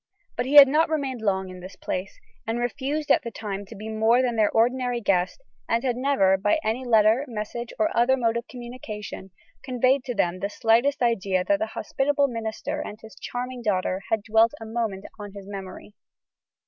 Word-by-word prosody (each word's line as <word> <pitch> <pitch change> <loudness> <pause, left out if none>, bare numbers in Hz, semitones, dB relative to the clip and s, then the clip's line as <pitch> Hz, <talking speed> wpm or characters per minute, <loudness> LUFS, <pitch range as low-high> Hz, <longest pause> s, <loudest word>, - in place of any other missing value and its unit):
But 245 - -2
he 285 - 0
had 285 -1 +12
not 310 +4 +2
remained 275 -6 -2
long 190 -3 -1
at 180 0 -10
this 185 +2 -10
place; 185 +1 -5 0.3
and 225 +1 -1
refused 280 +5 -2
at - - +5
the 235 - -5
time 205 -3 -6
to - - -11
be 215 +2 -8
more 220 +3 +3
than 245 -2 0
their 215 -2 +3
ordinary 245 +1 +1
guest; 195 - 0 0.3
and 230 +2 +1
had 250 -3 0
never, 245 -8 +3
by 205 +8 +2
any 225 +4 -1
letter, 225 +1 +4
message, 235 +1 -5
or 215 - 0
other 245 +3 +4
mode 230 -2 +1
of 235 0 -3
communication, 240 -6 -8 0.3
conveyed 255 +1 +1
to 245 - -3
them 180 -2 0
the 200 - -2
slightest 235 +5 +2
idea 195 -6 +1
that 300 +8 +1
the 330 - -1
hospitable 285 +1 +1
minister 230 +4 -4
and 215 -8 -7
his 220 -1 -12
charming 250 0 -5
daughter 190 -3 0
had 220 -2 0
dwelt 225 +4 +3
a 225 - -8
moment 220 -4 -3
on 205 -1 -8
his 200 -1 -10
memory. 195 0 -8
230 Hz, 195 wpm, -25 LUFS, 205-255 Hz, 0.3 s, had